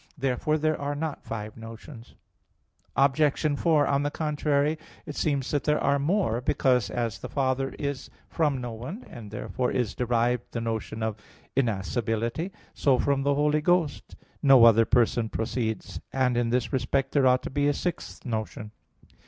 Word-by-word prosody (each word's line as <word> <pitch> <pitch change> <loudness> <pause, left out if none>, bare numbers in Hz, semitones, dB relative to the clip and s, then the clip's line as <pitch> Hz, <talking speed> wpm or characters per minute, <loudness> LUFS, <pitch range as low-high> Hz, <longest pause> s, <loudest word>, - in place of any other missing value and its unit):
Therefore 135 +3 0
there 155 -1 0
are 145 +1 -2
not 155 0 -3
five 105 -1 -6
notions. 115 +2 -11 0.8
Obj. 145 +2 +2
4: 160 -4 +3
On 140 0 +1
the 145 - 0
contrary, 150 0 0 0.3
It 150 - -7
seems 140 -4 0
that 145 - 0
there 150 0 +2
are 140 0 +2
more; 145 - +1
because 125 -2 +2
as 115 -5 -2
the - - -7
Father 135 -1 -1
is 140 -2 -4 0.2
from 150 -5 0
no 120 -1 -5
one, 130 - -7
and 110 -3 -10
therefrom 125 +4 -2
is 125 -5 0
derived 120 0 0
the 115 - -2
notion 110 -1 -3
of 110 -1 -2 0.4
innascibility; 115 - -1 0.2
so 135 -3 +3
from 140 0 +1
the 140 +1 +2
Holy 150 +1 +2
Ghost 170 -3 0 0.3
no 135 -5 +7
other 115 0 +6
person 120 -1 +2
proceeds. 110 -1 -3
And 130 -2 +1
in 120 -1 +1
this 125 +3 0
respect 135 +1 0
there 140 -3 +4
ought 130 0 +3
to - - -5
be 145 +1 +1
a - - +4
sixth 175 -3 -4
notion. 110 -1 -4
130 Hz, 165 wpm, -27 LUFS, 115-145 Hz, 0.8 s, no